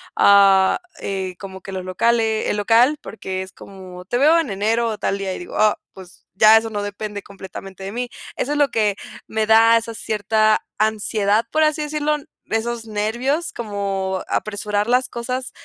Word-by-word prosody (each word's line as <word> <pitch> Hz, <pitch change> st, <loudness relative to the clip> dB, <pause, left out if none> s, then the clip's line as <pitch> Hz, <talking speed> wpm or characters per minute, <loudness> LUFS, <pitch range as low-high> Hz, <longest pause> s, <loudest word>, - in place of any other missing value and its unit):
ah, 195 Hz, -1 st, +5 dB, 0.2 s
eh, 190 Hz, -2 st, -4 dB
como 190 Hz, -1 st, -9 dB
que 195 Hz, -, -9 dB
los 185 Hz, -1 st, -5 dB
locale 220 Hz, +3 st, +1 dB
el -, -, 0 dB
local, 235 Hz, +8 st, +4 dB
porque 190 Hz, -3 st, -5 dB
es 190 Hz, -, -12 dB
como: 185 Hz, -2 st, -12 dB
"Te 240 Hz, -, -1 dB
veo 310 Hz, +6 st, +5 dB
en 320 Hz, -6 st, -2 dB
enero 220 Hz, +4 st, 0 dB
o 220 Hz, -2 st, -3 dB
tal 200 Hz, -, -2 dB
día". 195 Hz, -1 st, -3 dB
Y -, -, -7 dB
digo, 175 Hz, -, -7 dB
ah, 215 Hz, 0 st, +4 dB, 0.2 s
pues, 185 Hz, -2 st, -14 dB
ya 215 Hz, +3 st, +7 dB
eso 225 Hz, 0 st, -1 dB
no 205 Hz, -1 st, -3 dB
depende 205 Hz, 0 st, -5 dB
completamente 195 Hz, -1 st, -10 dB
de 195 Hz, -, -5 dB
mí. 245 Hz, +2 st, -4 dB, 0.3 s
Eso 290 Hz, -, -2 dB
es -, -, -1 dB
lo 290 Hz, -1 st, +3 dB
que 215 Hz, -5 st, +1 dB, 0.3 s
me 220 Hz, 0 st, -1 dB
da 225 Hz, +1 st, +6 dB
esa 230 Hz, 0 st, -4 dB
cierta 215 Hz, 0 st, +1 dB
ansiedad, 215 Hz, 0 st, +1 dB
por 315 Hz, -, +3 dB
así 305 Hz, 0 st, +1 dB
decirlo, 300 Hz, 0 st, -1 dB, 0.3 s
esos 225 Hz, +1 st, -2 dB
nervios, 235 Hz, +9 st, -1 dB
como 195 Hz, -4 st, -3 dB
apresurar 210 Hz, 0 st, -2 dB
las 250 Hz, +1 st, +2 dB
cosas 250 Hz, +2 st, -4 dB
215 Hz, 180 wpm, -21 LUFS, 195-235 Hz, 0.3 s, ya